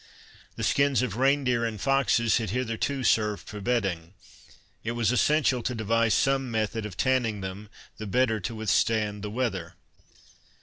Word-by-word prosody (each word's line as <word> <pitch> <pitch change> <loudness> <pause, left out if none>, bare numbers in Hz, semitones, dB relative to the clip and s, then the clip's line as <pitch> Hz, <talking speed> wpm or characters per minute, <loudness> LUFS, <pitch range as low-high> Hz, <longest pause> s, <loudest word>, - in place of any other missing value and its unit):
The - - -5
skins 140 -2 +2
of 110 -6 -3
rein 135 +2 +3
deer 125 -2 +1
and 110 -2 -3
foxes 135 -3 +2
had 110 - -3
hitherto 125 +4 -2
served 105 -3 +1
for 105 -1 -7
bedding. 95 -7 -1 0.7
It 115 - -2
was 120 -2 +1
essential 135 -1 +2
to 125 +2 -3
devise 115 0 +1
some 135 -1 +1
method 110 -1 -2
of 95 -4 -11
tanning 125 -6 +1
them, 95 +3 -7 0.3
the 110 - -6
better 110 +1 +1
to 110 +4 -5
withstand 110 -1 0
the 105 - -4
weather. 95 -7 -3
115 Hz, 160 wpm, -27 LUFS, 105-125 Hz, 0.7 s, rein